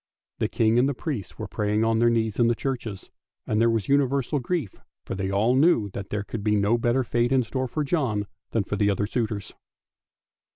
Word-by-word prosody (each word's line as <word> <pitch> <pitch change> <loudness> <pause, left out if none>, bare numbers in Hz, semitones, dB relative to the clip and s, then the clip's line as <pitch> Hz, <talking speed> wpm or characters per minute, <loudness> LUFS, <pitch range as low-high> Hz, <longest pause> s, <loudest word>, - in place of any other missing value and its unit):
The - - +1
King 115 +1 +2
and 135 +3 +3
the 140 - -2
priests 130 - -5
were - - -5
praying 105 +1 0
on 115 0 +2
their 120 0 +5
knees 110 -2 0
in 120 - +5
the 120 - +2
churches, 115 -7 -4 0.3
and 110 +1 +1
there 115 - +4
was 115 -3 0
universal 140 0 +2
grief, 140 - -2 0.3
for - - -4
they 95 0 -2
all 105 +6 +2
knew 130 - +3
that 100 0 -6
there 105 -1 -2
could 105 +1 -6
be 105 0 +2
no 105 +3 +3
better 120 +3 +2
fate 120 0 0
in 130 -1 +3
store 130 +2 -3
for 150 +5 -2
John 130 -10 0 0.2
than 110 - 0
for 105 - -3
the 105 0 +2
other 100 +1 0
suitors. 110 -3 -3
115 Hz, 215 wpm, -25 LUFS, 105-130 Hz, 0.3 s, their